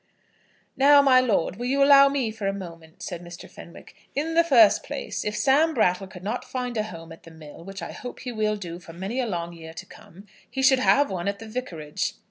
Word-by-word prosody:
"Now, 280 Hz, +1 st, +6 dB
my 260 Hz, -2 st, +6 dB
lord, 210 Hz, -7 st, 0 dB
will 245 Hz, +2 st, -4 dB
you 275 Hz, +2 st, +2 dB
allow 275 Hz, 0 st, +7 dB
me 270 Hz, -5 st, -1 dB
for 215 Hz, -2 st, -5 dB
a 195 Hz, -, 0 dB
moment?" 170 Hz, -4 st, -10 dB
said 175 Hz, -2 st, -6 dB
Mr. 175 Hz, 0 st, -11 dB
Fenwick. 170 Hz, -, -14 dB, 0.2 s
"In 310 Hz, +4 st, -2 dB
the 335 Hz, +1 st, +4 dB
first 240 Hz, -10 st, +5 dB
place, -, -, -5 dB
if 210 Hz, 0 st, -3 dB
Sam 300 Hz, +4 st, +3 dB
Brattle 190 Hz, -4 st, +1 dB
could 185 Hz, -1 st, -12 dB
not 220 Hz, +5 st, -3 dB
find 250 Hz, -2 st, -5 dB
a 215 Hz, -, +1 dB
home 165 Hz, -6 st, -9 dB
at 165 Hz, -, -12 dB
the -, -, -14 dB
mill, 160 Hz, 0 st, -13 dB
which 195 Hz, 0 st, -8 dB
I -, -, -6 dB
hope 245 Hz, -, -9 dB
he 250 Hz, -, -5 dB
will 215 Hz, -2 st, -1 dB
do 175 Hz, -4 st, -7 dB
for 165 Hz, -2 st, -13 dB
many 195 Hz, +9 st, -4 dB
a 250 Hz, -, -1 dB
long 170 Hz, -4 st, -4 dB
year 160 Hz, -1 st, -11 dB
to -, -, -8 dB
come, 190 Hz, +5 st, -16 dB, 0.2 s
he 265 Hz, -, -3 dB
should 265 Hz, 0 st, +5 dB
have 280 Hz, +1 st, +3 dB
one 180 Hz, 0 st, -4 dB
at 200 Hz, 0 st, -1 dB
the 225 Hz, +2 st, -10 dB
Vicarage." 180 Hz, -11 st, -4 dB
210 Hz, 235 wpm, -25 LUFS, 175-255 Hz, 0.2 s, allow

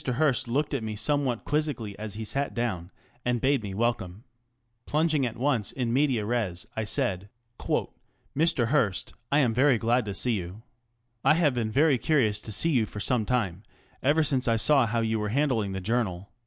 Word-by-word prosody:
Hearst 130 Hz, 0 st, +1 dB
looked 145 Hz, +6 st, -1 dB
at 135 Hz, -, -1 dB
me 110 Hz, -1 st, -4 dB
somewhat 135 Hz, 0 st, -1 dB
quizzically 145 Hz, -9 st, -1 dB
as 105 Hz, -2 st, -5 dB
he 110 Hz, 0 st, -5 dB
sat 140 Hz, +6 st, -2 dB
down 105 Hz, -8 st, -2 dB, 0.3 s
and 125 Hz, -1 st, 0 dB
bade 135 Hz, +1 st, +2 dB
me 100 Hz, -3 st, -6 dB
welcome. 110 Hz, -3 st, -2 dB, 0.6 s
Plunging 150 Hz, -3 st, +1 dB
at 115 Hz, -, -7 dB
once 125 Hz, -5 st, 0 dB
in 120 Hz, -3 st, -2 dB
medias 130 Hz, -5 st, +2 dB
res, 110 Hz, -5 st, -2 dB
I 110 Hz, -, -2 dB
said: 105 Hz, -5 st, -1 dB, 0.3 s
ŌĆö -, -, -1 dB, 0.2 s
" -, -, -41 dB
Mr. 135 Hz, -6 st, +2 dB
Hearst, 115 Hz, -10 st, 0 dB, 0.2 s
I 140 Hz, -, +4 dB
am 120 Hz, -4 st, +2 dB
very 130 Hz, +1 st, +4 dB
glad 120 Hz, +2 st, +1 dB
to 100 Hz, -2 st, -4 dB
see 125 Hz, +4 st, +1 dB
you. 95 Hz, +2 st, -5 dB, 0.6 s
I 155 Hz, -, +5 dB
have 155 Hz, -5 st, +3 dB
been 115 Hz, -3 st, -1 dB
very 140 Hz, +2 st, +3 dB
curious 115 Hz, -10 st, +1 dB
to 110 Hz, -, -8 dB
see 135 Hz, +11 st, +2 dB
you 120 Hz, -7 st, +2 dB
for 105 Hz, -, -8 dB
some 115 Hz, 0 st, +1 dB
time, 100 Hz, -8 st, -1 dB, 0.4 s
ever 150 Hz, +4 st, +3 dB
since 135 Hz, -4 st, 0 dB
I 115 Hz, -, +3 dB
saw 120 Hz, +3 st, +4 dB
how 115 Hz, +1 st, 0 dB
you 110 Hz, -1 st, 0 dB
were 105 Hz, 0 st, -2 dB
handling 115 Hz, -6 st, 0 dB
the 95 Hz, -, -3 dB
Journal. 100 Hz, -3 st, -2 dB
120 Hz, 195 wpm, -27 LUFS, 105-140 Hz, 0.6 s, I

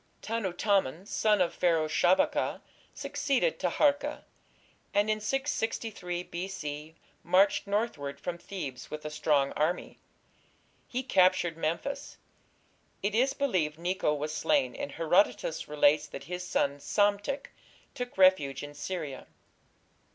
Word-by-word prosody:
Tanutamon, 195 Hz, -7 st, 0 dB
a -, -, -18 dB
son 210 Hz, -1 st, +2 dB
of 175 Hz, -, +1 dB
Pharaoh 165 Hz, -3 st, +2 dB
Shabaka, 175 Hz, +4 st, +2 dB, 0.3 s
succeeded 290 Hz, -, 0 dB
Taharka, 290 Hz, 0 st, +1 dB, 0.7 s
and 205 Hz, +1 st, +3 dB
in 215 Hz, -, 0 dB
663 225 Hz, -7 st, -2 dB
B.C. 160 Hz, -4 st, -6 dB, 0.3 s
marched 200 Hz, +2 st, +3 dB
northward 160 Hz, -10 st, -2 dB
from 170 Hz, +4 st, -4 dB
Thebes 145 Hz, -12 st, -6 dB
with 150 Hz, 0 st, -7 dB
a 150 Hz, -, -4 dB
strong 150 Hz, -2 st, +2 dB
army. 160 Hz, +4 st, -1 dB, 0.9 s
He 255 Hz, +1 st, -3 dB
captured 185 Hz, -7 st, +3 dB
Memphis. 170 Hz, -, -3 dB, 0.9 s
It 200 Hz, +1 st, 0 dB
is 255 Hz, +5 st, +3 dB
believed 180 Hz, -, 0 dB
Necho 175 Hz, -1 st, 0 dB
was 150 Hz, +1 st, -3 dB
slain, 275 Hz, -, +1 dB
and 285 Hz, 0 st, -5 dB
Herodotus 165 Hz, -1 st, +1 dB
relates 150 Hz, 0 st, +3 dB
that -, -, -8 dB
his 180 Hz, +3 st, -5 dB
son 140 Hz, -5 st, 0 dB
Psamtik 205 Hz, -, 0 dB, 0.4 s
took 245 Hz, -4 st, -6 dB
refuge 170 Hz, -8 st, +4 dB
in 145 Hz, 0 st, -7 dB
Syria. 145 Hz, -3 st, -5 dB
180 Hz, 120 wpm, -30 LUFS, 155-215 Hz, 0.9 s, refuge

